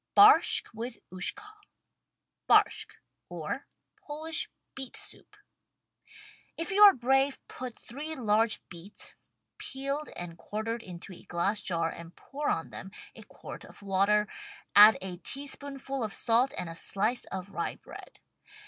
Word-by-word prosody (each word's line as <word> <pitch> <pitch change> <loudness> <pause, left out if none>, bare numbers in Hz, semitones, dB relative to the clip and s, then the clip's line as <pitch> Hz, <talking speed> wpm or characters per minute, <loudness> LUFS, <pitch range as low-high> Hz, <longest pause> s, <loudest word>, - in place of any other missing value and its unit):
BARSHCK 420 - +7
WITH 230 +2 -5
USHKA 190 - -3 1.0
Barshck. - - +4 0.3
{Or - - -5 0.4
Polish 315 0 -3 0.2
Beet 270 -2 -5
Soup) 420 - -10 1.2
If 330 +5 -2
you 400 +2 +2
are 410 -1 +11
brave, 270 +3 +2
put 250 -2 -7
three 300 +6 -6
large 225 -3 +1
beets, 175 +4 -9 0.5
peeled 275 +3 -3
and 170 -1 -5
quar 215 +1 -4
tered 230 +1 -3
into 180 -1 -8
a - - -12
glass 195 +5 0
jar 165 -4 0
and 170 +1 -9
pour 290 +2 -4
on 165 - -1
them 190 - -8 0.3
a - - -10
quart - - -10
of - - -14
water, 200 +2 +3 0.5
add 210 +2 +10
a 185 -2 -5
teaspoonful 275 +2 -2
of 215 -2 -3
salt 240 +4 +4
and 180 - -1
a 165 - -6
slice 210 +8 0
of 190 +1 -6
rye - - -3
bread. - - -13
230 Hz, 140 wpm, -29 LUFS, 190-275 Hz, 1.2 s, are